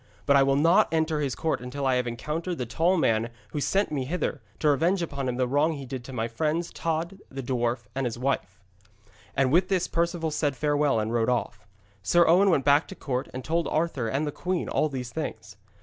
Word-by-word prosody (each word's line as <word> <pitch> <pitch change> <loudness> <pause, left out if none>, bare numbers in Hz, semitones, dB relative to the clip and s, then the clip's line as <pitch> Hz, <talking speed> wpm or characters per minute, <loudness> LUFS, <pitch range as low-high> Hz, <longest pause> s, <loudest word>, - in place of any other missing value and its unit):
But 140 - +4
I 140 - +6
will 135 0 +3
not 165 +9 +4
enter 160 -1 +1
his 140 -4 -1
court 160 -7 -1
until 130 +3 -4
I 130 - +3
have 125 -1 0
encountered 160 +9 -3
the 125 - -2
tall 165 +11 +1
man 115 -9 +3
there 115 +1 -5 0.2
who 150 - -3
sent 195 +5 +1
me 135 -4 -1
hither, 160 -3 -2 0.2
to 150 - +3
revenge 170 +6 +2
upon 140 -5 -3
him 125 - -2
the 125 0 +1
wrong 145 +5 +2
he 140 -3 -7
did 130 -1 -6
to 135 - -8
my 115 -3 -2
friends, 155 +8 -2
Tod 165 +3 -2
the 135 0 -6
dwarf 120 -1 -1
and 135 -1 -1
his 120 - -5
wife.' 120 -7 -2 0.8
And 135 -2 +3
with 175 +4 +4
this 185 -3 +1
Perceval 170 -1 -1
said 145 -2 0
farewell 145 -2 +1
and 110 +2 -2
rode 115 0 +2
off. 105 -4 -2 0.3
Sir 170 - +4
Owen 185 +5 +5
went 145 -7 +2
back 145 +2 +4
to 190 - -9
the - - -32
court, 130 0 -2
and 130 0 -6
told 165 +1 0
Arthur 155 -7 -1
and 135 +7 0
the 145 - -2
queen 180 +3 -2
all 155 - +1
these 125 -3 -5
things. 110 -9 -5
145 Hz, 230 wpm, -26 LUFS, 125-165 Hz, 0.8 s, I